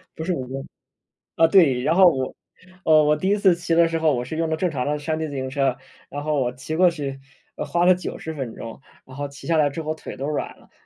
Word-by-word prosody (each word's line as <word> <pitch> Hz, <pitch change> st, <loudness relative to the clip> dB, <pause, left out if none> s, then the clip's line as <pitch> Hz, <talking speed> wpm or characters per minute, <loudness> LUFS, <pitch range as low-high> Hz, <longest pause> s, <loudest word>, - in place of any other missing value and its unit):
不 160 Hz, -, -5 dB
是 180 Hz, -, -1 dB
5 130 Hz, -6 st, -4 dB
公 135 Hz, +1 st, -6 dB, 0.7 s
啊， 165 Hz, -, +6 dB
对， 160 Hz, -8 st, +4 dB
然 155 Hz, +5 st, +2 dB
后 190 Hz, +1 st, +7 dB
我 130 Hz, -6 st, -1 dB, 0.5 s
呃， 155 Hz, -1 st, +5 dB
我 150 Hz, +1 st, +3 dB
第 185 Hz, +5 st, -2 dB
1 205 Hz, -, +3 dB
次 195 Hz, -3 st, +4 dB
骑 170 Hz, -1 st, -1 dB
的 170 Hz, 0 st, +5 dB
时 165 Hz, 0 st, -1 dB
候， 155 Hz, -2 st, +2 dB
我 120 Hz, 0 st, -2 dB
是 155 Hz, +5 st, -6 dB
用 165 Hz, 0 st, 0 dB
的 160 Hz, -, 0 dB
正 180 Hz, +2 st, 0 dB
常 130 Hz, -4 st, -3 dB
的 150 Hz, 0 st, -1 dB
山 155 Hz, +2 st, -2 dB
地 160 Hz, -1 st, -3 dB
自 145 Hz, -, -7 dB
行 130 Hz, -1 st, -3 dB
车。 135 Hz, -2 st, 0 dB, 0.3 s
然 145 Hz, +1 st, -6 dB
后 150 Hz, -1 st, 0 dB
我 125 Hz, -1 st, 0 dB
骑 135 Hz, +5 st, -5 dB
过 180 Hz, +1 st, +5 dB
去， 140 Hz, -4 st, -5 dB, 0.4 s
呃， -, -, -3 dB
花 175 Hz, 0 st, +1 dB
了 185 Hz, -, +6 dB
90 175 Hz, -2 st, -6 dB
分 130 Hz, -6 st, -5 dB
钟， 115 Hz, +3 st, -9 dB, 0.2 s
然 130 Hz, -, -13 dB
后 145 Hz, 0 st, -4 dB
骑 140 Hz, -, -13 dB
下 165 Hz, -, +2 dB
来 150 Hz, -1 st, +4 dB
之 150 Hz, +3 st, -5 dB
后 155 Hz, 0 st, -3 dB
腿 160 Hz, -, -9 dB
都 135 Hz, -, -4 dB
软 150 Hz, -, -3 dB
了， -, -, -23 dB
150 Hz, 275 characters per minute, -23 LUFS, 135-165 Hz, 0.7 s, 后